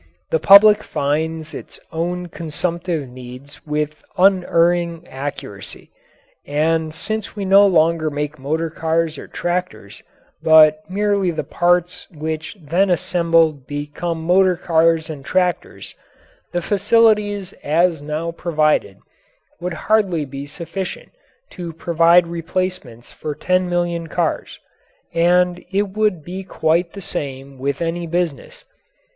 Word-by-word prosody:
The 160 Hz, -, +2 dB
public 205 Hz, +4 st, +8 dB
finds 155 Hz, +2 st, -2 dB
its -, -, -9 dB
own 175 Hz, +2 st, -2 dB
consumptive 170 Hz, -1 st, -3 dB
needs 125 Hz, +3 st, -11 dB
with 150 Hz, 0 st, -3 dB
unerring 175 Hz, -2 st, +2 dB
accuracy, 140 Hz, +2 st, -7 dB, 0.5 s
and 160 Hz, +2 st, 0 dB
since 215 Hz, +6 st, -5 dB
we 200 Hz, -2 st, -4 dB
no 200 Hz, +1 st, +6 dB
longer 165 Hz, -3 st, +2 dB
make 150 Hz, 0 st, -4 dB
motor 160 Hz, +4 st, -2 dB
cars 165 Hz, 0 st, -1 dB
or -, -, -9 dB
tractors, 175 Hz, -, -4 dB, 0.4 s
but 155 Hz, -1 st, +6 dB
merely 200 Hz, -1 st, +1 dB
the 160 Hz, -, -2 dB
parts 175 Hz, 0 st, 0 dB
which 160 Hz, +4 st, -5 dB
when 185 Hz, +6 st, +2 dB
assembled 165 Hz, -5 st, +1 dB
become 150 Hz, +3 st, -4 dB
motor 185 Hz, +2 st, +4 dB
cars 165 Hz, -2 st, +2 dB
and 150 Hz, -4 st, -7 dB
tractors, 180 Hz, +3 st, -1 dB, 0.6 s
the 175 Hz, -1 st, -2 dB
facilities 205 Hz, -1 st, +2 dB
as 165 Hz, +1 st, +2 dB
now 155 Hz, +3 st, -3 dB
provided 155 Hz, -3 st, 0 dB, 0.6 s
would 180 Hz, 0 st, -4 dB
hardly 195 Hz, -8 st, +2 dB
be 140 Hz, +1 st, -7 dB
sufficient 175 Hz, +5 st, -6 dB, 0.4 s
to 170 Hz, -2 st, -7 dB
provide 170 Hz, +1 st, +4 dB
replacements 170 Hz, -7 st, -4 dB
for 150 Hz, -1 st, -6 dB
ten 185 Hz, +2 st, 0 dB
million 175 Hz, -1 st, -1 dB
cars. 165 Hz, 0 st, -2 dB, 0.5 s
And 180 Hz, +1 st, +2 dB
it 200 Hz, +1 st, 0 dB
would 210 Hz, -5 st, 0 dB
be 185 Hz, +2 st, -6 dB
quite 170 Hz, -1 st, 0 dB
the 200 Hz, -, -8 dB
same 135 Hz, -4 st, -5 dB
with 140 Hz, +4 st, -2 dB
any 170 Hz, +1 st, -3 dB
business. 170 Hz, -3 st, -3 dB
170 Hz, 120 wpm, -20 LUFS, 155-180 Hz, 0.6 s, public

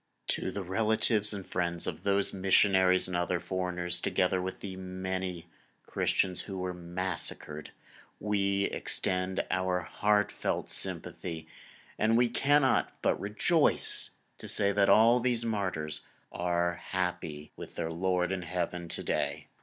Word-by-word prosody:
To -, -, -1 dB
the 100 Hz, -, -4 dB
relatives 105 Hz, +2 st, +2 dB
and 100 Hz, -3 st, -4 dB
friends 85 Hz, -1 st, -2 dB
of -, -, -4 dB
those 100 Hz, 0 st, +1 dB
missionaries 95 Hz, -1 st, +4 dB
and 90 Hz, -, -3 dB
other 90 Hz, 0 st, 0 dB
foreigners, 90 Hz, -1 st, -2 dB
together 95 Hz, 0 st, +1 dB
with 95 Hz, +1 st, -5 dB
the 95 Hz, -2 st, -6 dB
many 95 Hz, -1 st, -4 dB, 0.4 s
Christians 90 Hz, -2 st, 0 dB
who 95 Hz, -2 st, -6 dB
were 90 Hz, 0 st, -2 dB
massacred, 85 Hz, -3 st, -3 dB, 0.5 s
we 100 Hz, -1 st, +1 dB
extend 90 Hz, -1 st, 0 dB
our 95 Hz, -1 st, +1 dB
heartfelt 105 Hz, +3 st, 0 dB
sympathy, 80 Hz, -2 st, -3 dB, 0.5 s
and 110 Hz, +1 st, +3 dB
we 120 Hz, 0 st, +4 dB
cannot 135 Hz, +2 st, +2 dB
but -, -, +2 dB
rejoice 105 Hz, +11 st, +2 dB, 0.3 s
to -, -, -7 dB
say 100 Hz, 0 st, +3 dB
that 100 Hz, 0 st, +3 dB
all 115 Hz, +3 st, +6 dB
these 120 Hz, -1 st, +1 dB
martyrs 90 Hz, -9 st, -1 dB, 0.2 s
are 85 Hz, 0 st, 0 dB
happy 90 Hz, -5 st, -3 dB
with -, -, -10 dB
their 80 Hz, -, -2 dB
Lord 90 Hz, +1 st, 0 dB
in 95 Hz, -1 st, -2 dB
Heaven 90 Hz, 0 st, -3 dB
to -, -, -4 dB
day. -, -, -2 dB
95 Hz, 135 wpm, -30 LUFS, 90-100 Hz, 0.5 s, all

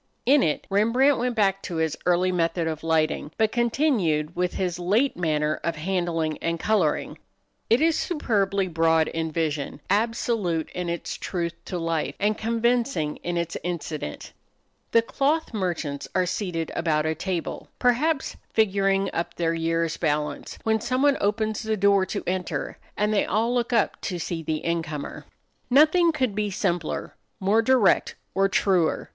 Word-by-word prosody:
In 275 Hz, +2 st, +5 dB
it 150 Hz, -, 0 dB
Rembrandt 240 Hz, +7 st, +3 dB
went 245 Hz, 0 st, -1 dB
back 195 Hz, -2 st, +2 dB
to 175 Hz, -, -5 dB
his 160 Hz, -1 st, 0 dB
early 180 Hz, +1 st, +3 dB
method 170 Hz, -1 st, 0 dB
of 160 Hz, -1 st, -4 dB
lighting, 160 Hz, -2 st, +1 dB
but 220 Hz, -1 st, +2 dB
continued 225 Hz, -, +1 dB
with 180 Hz, 0 st, -1 dB
his 180 Hz, -2 st, -2 dB
late 215 Hz, +10 st, +2 dB
manner 155 Hz, -3 st, 0 dB
of 170 Hz, -1 st, -1 dB
handling 165 Hz, -2 st, -1 dB
and 165 Hz, 0 st, -2 dB
coloring. 190 Hz, -8 st, 0 dB, 0.5 s
It 235 Hz, +5 st, +4 dB
is 325 Hz, 0 st, +3 dB
superbly 200 Hz, -, 0 dB
broad 165 Hz, -1 st, +2 dB
in 160 Hz, -1 st, -3 dB
vision, 155 Hz, -3 st, -2 dB
absolute 210 Hz, -6 st, 0 dB
in 180 Hz, -1 st, -3 dB
its 170 Hz, 0 st, -4 dB
truth 170 Hz, -2 st, -3 dB
to 180 Hz, -, -4 dB
life, 165 Hz, -2 st, -1 dB
and 210 Hz, +1 st, +2 dB
convincing 230 Hz, -, 0 dB
in 175 Hz, 0 st, -3 dB
its 170 Hz, -1 st, -2 dB
incident. 160 Hz, -, -5 dB, 0.6 s
The 230 Hz, -, +4 dB
cloth 285 Hz, +5 st, 0 dB
merchants 170 Hz, -8 st, -2 dB
are 185 Hz, -1 st, +3 dB
seated 180 Hz, -3 st, -3 dB
about 155 Hz, -2 st, +1 dB
a 160 Hz, -, +1 dB
table, 180 Hz, 0 st, -4 dB
perhaps 270 Hz, +4 st, +1 dB, 0.2 s
figuring 195 Hz, -2 st, +2 dB
up 170 Hz, 0 st, -3 dB
their 165 Hz, -1 st, 0 dB
year's 165 Hz, 0 st, 0 dB
balance, 150 Hz, -2 st, -2 dB
when 220 Hz, -1 st, +1 dB
someone 265 Hz, +4 st, +2 dB
opens 215 Hz, +1 st, 0 dB
the 220 Hz, -1 st, -1 dB
door 200 Hz, -1 st, +3 dB
to -, -, -4 dB
enter 185 Hz, 0 st, -3 dB, 0.2 s
and 210 Hz, +1 st, +1 dB
they 205 Hz, -, +2 dB
all 225 Hz, +5 st, +1 dB
look 240 Hz, -1 st, 0 dB
up 230 Hz, -3 st, +1 dB
to 185 Hz, -4 st, -3 dB
see 170 Hz, 0 st, -3 dB
the 155 Hz, -1 st, -3 dB
incomer. 160 Hz, -3 st, -3 dB, 0.4 s
Nothing 310 Hz, +6 st, +5 dB
could 260 Hz, -8 st, 0 dB
be 210 Hz, 0 st, -1 dB
simpler, 175 Hz, -4 st, -2 dB, 0.3 s
more 200 Hz, +4 st, +3 dB
direct, 235 Hz, -4 st, +3 dB, 0.2 s
or 195 Hz, 0 st, +2 dB
truer. 185 Hz, -5 st, +1 dB
185 Hz, 155 wpm, -25 LUFS, 165-225 Hz, 0.6 s, In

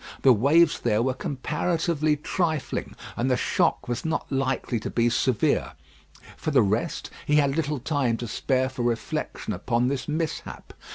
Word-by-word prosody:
The 130 Hz, -, +8 dB
waves 150 Hz, +8 st, +4 dB
there 115 Hz, -1 st, +1 dB
were 130 Hz, +1 st, +1 dB
comparatively 155 Hz, +3 st, -1 dB
trifling, 160 Hz, -1 st, -2 dB, 0.2 s
and 125 Hz, +3 st, 0 dB
the 125 Hz, -, +2 dB
shock -, -, +1 dB
was 120 Hz, -1 st, -2 dB
not 160 Hz, 0 st, -1 dB
likely 135 Hz, -3 st, -1 dB
to -, -, -5 dB
be 115 Hz, -, 0 dB
very -, -, -4 dB
severe. 120 Hz, -1 st, +1 dB, 0.6 s
For -, -, -3 dB
the 135 Hz, -6 st, +4 dB
rest, 110 Hz, +11 st, -1 dB, 0.2 s
he 150 Hz, -, +3 dB
had 140 Hz, -2 st, +3 dB
little 150 Hz, -2 st, 0 dB
time 130 Hz, -3 st, 0 dB
to 120 Hz, -, -5 dB
spare 130 Hz, +3 st, 0 dB
for 130 Hz, -1 st, -6 dB
reflection 120 Hz, -1 st, -2 dB
upon 120 Hz, +2 st, 0 dB
this 135 Hz, -2 st, -3 dB
mishap. 155 Hz, +1 st, -4 dB
135 Hz, 165 wpm, -25 LUFS, 120-150 Hz, 0.6 s, The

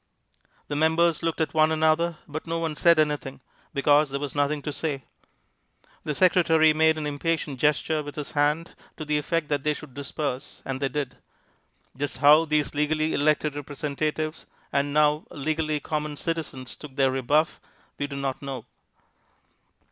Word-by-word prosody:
The 145 Hz, -, -3 dB
members 160 Hz, +2 st, +3 dB
looked 165 Hz, -1 st, -1 dB
at 160 Hz, -, -1 dB
one 155 Hz, 0 st, +4 dB
another, 160 Hz, +1 st, +2 dB
but 155 Hz, +2 st, -6 dB
no 165 Hz, 0 st, -1 dB
one 165 Hz, -2 st, -2 dB
said 170 Hz, +1 st, +5 dB
anything, 150 Hz, -3 st, 0 dB, 0.3 s
because 145 Hz, +1 st, +3 dB
there 140 Hz, +1 st, -3 dB
was 145 Hz, -1 st, -4 dB
nothing 145 Hz, 0 st, 0 dB
to 150 Hz, -, -3 dB
say. 140 Hz, -2 st, -3 dB, 1.0 s
The 150 Hz, -, -2 dB
secretary 165 Hz, -3 st, +5 dB
made 160 Hz, 0 st, +3 dB
an 155 Hz, -, -3 dB
impatient 145 Hz, -1 st, -2 dB
gesture 150 Hz, +2 st, +2 dB
with 145 Hz, -1 st, -8 dB
his 150 Hz, -2 st, -5 dB
hand 150 Hz, +3 st, +1 dB, 0.3 s
to 155 Hz, -, -5 dB
the 150 Hz, 0 st, +1 dB
effect 160 Hz, +1 st, -1 dB
that 145 Hz, -2 st, 0 dB
they 150 Hz, 0 st, +1 dB
should 150 Hz, -4 st, -11 dB
disperse, 140 Hz, -1 st, -5 dB
and 135 Hz, -1 st, -3 dB
they 135 Hz, -, +1 dB
did. 140 Hz, -1 st, -4 dB, 0.8 s
Just 145 Hz, +1 st, -3 dB
how 150 Hz, +4 st, +6 dB
these 150 Hz, -2 st, +1 dB
legally 155 Hz, +1 st, +1 dB
elected 150 Hz, 0 st, +2 dB
representatives 150 Hz, +2 st, -3 dB, 0.3 s
and 140 Hz, +1 st, +1 dB
now 150 Hz, +1 st, +3 dB
legally 155 Hz, +1 st, -1 dB
common 150 Hz, -1 st, -3 dB
citizens 155 Hz, -6 st, -4 dB
took 145 Hz, -3 st, -11 dB
their 135 Hz, -2 st, +3 dB
rebuff 145 Hz, +5 st, +1 dB, 0.4 s
we 145 Hz, -, -1 dB
do 140 Hz, -, -7 dB
not 135 Hz, -1 st, -3 dB
know. 135 Hz, -4 st, -6 dB
150 Hz, 165 wpm, -26 LUFS, 145-155 Hz, 1.0 s, how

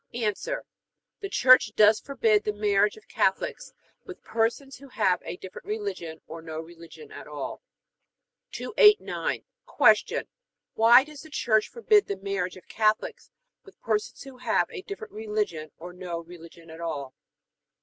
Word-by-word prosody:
A. 235 Hz, -2 st, -1 dB, 1.0 s
The 395 Hz, -, -4 dB
Church 255 Hz, -, +5 dB
does 215 Hz, 0 st, +6 dB
forbid 220 Hz, -6 st, +1 dB
the 210 Hz, -, -1 dB
marriage 205 Hz, -, +2 dB
of 435 Hz, -, -17 dB
Catholics -, -, -1 dB, 0.3 s
with 375 Hz, -, -11 dB
persons 235 Hz, +4 st, -1 dB
who 275 Hz, +2 st, -14 dB
have 195 Hz, -8 st, +1 dB
a 170 Hz, -, -5 dB
different 190 Hz, -, -11 dB
religion 405 Hz, -, -5 dB
or 165 Hz, +1 st, -9 dB
no 160 Hz, -1 st, -6 dB
religion 170 Hz, -, -12 dB
at -, -, -10 dB
all. -, -, -6 dB, 0.9 s
289. 425 Hz, -1 st, +3 dB, 0.2 s
Q. -, -, +3 dB, 0.5 s
Why 235 Hz, +3 st, +7 dB
does 300 Hz, -1 st, -12 dB
the 315 Hz, -, -13 dB
Church 220 Hz, -7 st, +1 dB
forbid 430 Hz, -3 st, +3 dB
the 200 Hz, -, -3 dB
marriage 190 Hz, -2 st, -3 dB
of 185 Hz, -, -16 dB
Catholics 215 Hz, -1 st, 0 dB, 0.3 s
with 395 Hz, -, -18 dB
persons 215 Hz, +1 st, -2 dB
who 270 Hz, -1 st, -12 dB
have 240 Hz, -3 st, +1 dB
a 415 Hz, -6 st, -6 dB
different 400 Hz, +2 st, -9 dB
religion 210 Hz, -8 st, -3 dB
or 175 Hz, +2 st, -9 dB
no 180 Hz, -2 st, -5 dB
religion 170 Hz, -1 st, -14 dB
at 160 Hz, +1 st, -10 dB
all? 145 Hz, -5 st, -4 dB
215 Hz, 150 wpm, -26 LUFS, 175-275 Hz, 1.0 s, Why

